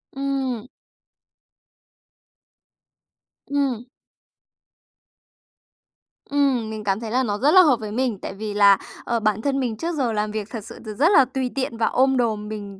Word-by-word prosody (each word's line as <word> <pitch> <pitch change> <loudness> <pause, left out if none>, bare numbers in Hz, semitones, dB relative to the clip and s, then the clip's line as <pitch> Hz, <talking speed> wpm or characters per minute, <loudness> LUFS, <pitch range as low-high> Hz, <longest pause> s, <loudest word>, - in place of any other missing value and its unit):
Ừm. 270 -4 -2 2.8
Ừm. 270 -4 -1 2.4
Ừm, 270 -6 +1
mình 215 -1 -6
cảm 195 +1 0
thấy 225 -2 -6
là 260 +1 +2
nó 205 -3 -1
rất 280 +7 +3
là 370 +1 +8
hợp 290 -8 +4
với 215 -1 -6
mình 240 -1 -1
tại - - -6
vì 210 +1 -5
là, 200 -1 +6 0.3
ờ, 235 -1 -1
bản 215 -1 0
thân 275 +2 0
mình 235 -4 -2
trước 335 +6 -3
giờ 255 -5 0
làm 210 0 -1
việc 215 -1 -4
thật 225 -4 -6
sự - - -10
thì 215 - -5
rất 310 - +3
là 275 -9 +6
tùy 255 0 -3
tiện 260 -4 -2
và 225 - +1
ôm 265 +1 +2
đồm. 215 -4 -1
Mình, 205 -2 -7
235 Hz, 165 wpm, -22 LUFS, 215-270 Hz, 2.8 s, là